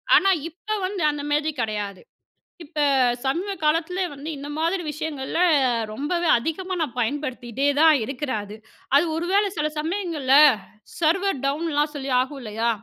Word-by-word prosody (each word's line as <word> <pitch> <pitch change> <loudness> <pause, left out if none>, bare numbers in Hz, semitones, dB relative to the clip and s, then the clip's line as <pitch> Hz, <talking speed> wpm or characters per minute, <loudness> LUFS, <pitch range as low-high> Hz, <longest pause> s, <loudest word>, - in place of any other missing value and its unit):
ஆனா, 390 - +5 0.2
இப்ப 365 +5 -20 0.2
வந்து 380 -1 -3
அந்த 295 -1 -5
மாரி 300 +1 +1
கெடையாது. 210 -4 -3 0.6
இப்ப 310 0 -7 0.5
சமீப 345 +10 -1
காலத்துல 330 +4 +1
வந்து 285 +3 -7
இந்த 285 +1 -7
மாதிரி 335 +3 0
விஷயங்கள்ல 305 -1 -4 0.5
ரொம்பவே 315 +9 -1
அதிகமா 325 +8 -3
நான் 290 -7 -2
பயன்படுத்திட்டேதான் 280 +4 +2
இருக்கிறேன் 260 -3 -3
அது. 205 - -9 0.4
அது 295 - +5
ஒருவேள 380 +5 +2
சில 300 0 +1
சமயங்கள்ல 320 -5 -1 0.7
சர்வர் 350 +1 +1
டவுன்லாம் 295 +1 0
சொல்லி 275 -1 -4
ஆகும் 270 +2 -2
இல்லையா? 225 0 -1
300 Hz, 130 wpm, -23 LUFS, 265-335 Hz, 0.7 s, ஆனா